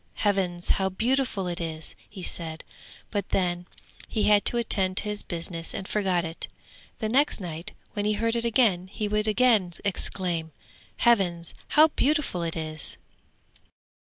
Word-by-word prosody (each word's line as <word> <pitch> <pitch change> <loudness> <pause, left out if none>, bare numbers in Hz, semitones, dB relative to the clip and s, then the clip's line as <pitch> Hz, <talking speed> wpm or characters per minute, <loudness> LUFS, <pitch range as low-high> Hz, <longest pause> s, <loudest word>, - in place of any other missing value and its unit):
'Heavens, 185 -4 +1
how 190 -1 +2
beautiful 230 0 0
it 175 0 -3
is!' 160 -1 -5 0.2
he 195 -3 -9
said, 160 -2 -3 0.5
but 200 -3 -2
then 175 -1 0 0.4
he 215 - -1
had 205 -1 +4
to 240 - +7
attend 190 -5 +1
to - - +6
his 210 -1 0
business 170 -1 -4
and 190 - -5
forgot 185 -5 0
it. 165 +1 -6 0.5
The 220 - -2
next 270 +5 +2
night 170 -3 -6 0.2
when 205 -1 -2
he 210 - +2
heard 230 +2 0
it 235 - 0
again 220 -6 +2
he 210 +2 -3
would 210 +1 0
again 215 -5 +3
exclaim, 175 -4 -1 0.4
'Heavens, 180 -8 +2
how 310 +1 +6
beautiful 295 - +1
it 165 -1 -2
is!' 155 -1 -3
190 Hz, 155 wpm, -26 LUFS, 175-220 Hz, 0.5 s, to